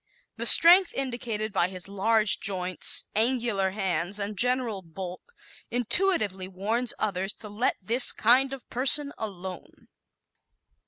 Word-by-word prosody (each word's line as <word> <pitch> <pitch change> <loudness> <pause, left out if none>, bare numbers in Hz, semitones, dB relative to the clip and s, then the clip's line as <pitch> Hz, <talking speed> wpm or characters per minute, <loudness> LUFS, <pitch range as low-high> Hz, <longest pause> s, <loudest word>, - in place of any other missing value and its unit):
The - - -3
strength 360 +2 +6
indicated 235 -5 -4
by 175 -3 +1
his 185 0 -10
large 210 +2 +1
joints, 185 -2 +1
angular 225 -4 0
hands 190 -1 -2
and 205 +1 -5
general 245 -2 0
bulk 180 +1 -8 0.5
intuitively 230 - 0
warns 215 +6 -1
others 195 -1 -3
to 210 - -11
let 210 +5 -1
this 230 +6 +4
kind 255 +4 +2
of 270 -3 -10
person 280 +3 +2
alone. 190 -4 -9
215 Hz, 120 wpm, -25 LUFS, 190-245 Hz, 0.5 s, strength